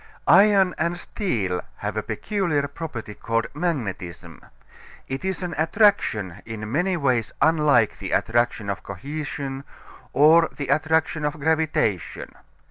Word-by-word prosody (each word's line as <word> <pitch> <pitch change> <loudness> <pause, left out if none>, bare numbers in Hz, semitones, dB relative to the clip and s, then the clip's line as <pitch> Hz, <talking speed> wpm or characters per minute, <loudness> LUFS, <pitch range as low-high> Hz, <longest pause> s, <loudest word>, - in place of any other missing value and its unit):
Iron 195 -1 +6
and 170 +2 0
steel 100 - -2 0.2
have - - -4
a - - 0
peculiar 170 -9 -1
property 140 -8 -7
called 115 +2 -1
magnetism. 100 - -4 0.6
It 135 +1 -4
is 190 -1 -2
an 175 -2 -3
attraction 160 - +2
in 110 -1 -6
many 180 +6 +1
ways 130 -7 0
unlike 150 -8 +3
the - - -5
attraction 120 -2 +1
of 100 - -5
cohesion 140 +4 -5 0.5
or 160 +3 +5
the 140 -3 -4
attraction 160 0 +1
of 150 +1 -2
gravitation. 155 - 0
145 Hz, 125 wpm, -24 LUFS, 115-165 Hz, 0.6 s, Iron